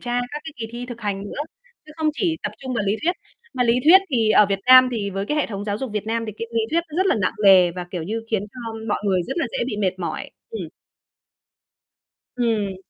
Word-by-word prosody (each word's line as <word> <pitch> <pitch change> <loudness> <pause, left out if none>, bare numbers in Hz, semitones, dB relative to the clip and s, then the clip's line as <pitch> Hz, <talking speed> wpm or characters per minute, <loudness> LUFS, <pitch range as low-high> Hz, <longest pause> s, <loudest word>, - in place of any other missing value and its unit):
tra 245 0 -1
các 295 - -5
cái 320 - -7
kỳ 225 -2 -4
thi 245 +1 -6
thực 240 -2 -8
hành 200 -2 -3
nữa, 205 - -7 0.5
chứ 305 - -12
không 315 -1 +1
chỉ 330 -1 0
tập - - -3
trung 260 -1 -5
vào 220 - 0
lý 205 +2 +1
thuyết. 345 +3 +2 0.4
Mà 250 - +1
lý 230 - +3
thuyết 360 +5 +9
thì 225 -5 +2
ở 210 -1 +6
Việt 195 0 -1
Nam 255 0 +9
thì 205 -4 -2
với 195 +1 -3
cái 300 - -1
hệ 300 - +1
thống 205 -2 -5
giáo 205 0 -2
dục 265 -1 -4
Việt 210 0 -3
Nam 230 +1 -1
thì 215 - -5
cái 230 - -4
lý 230 - +1
thuyết 335 +1 +3
nó 305 - -7
rất 375 - +2
là - - +3
nặng 185 - +1
nề 185 -3 +7
và, 180 0 -6
kiểu 175 -3 -4
như, 220 +6 -3
khiến 215 -3 +1
cho 250 - -9 0.3
mọi 205 - +1
người 190 -3 +2
rất 265 - -4
là 320 - +1
dễ - - -3
bị 215 - -3
mệt 185 -2 0
mỏi, 175 - -4 0.2
ừm. 450 - -5 1.7
Ừm. 215 -5 0
225 Hz, 260 wpm, -22 LUFS, 200-255 Hz, 1.7 s, thuyết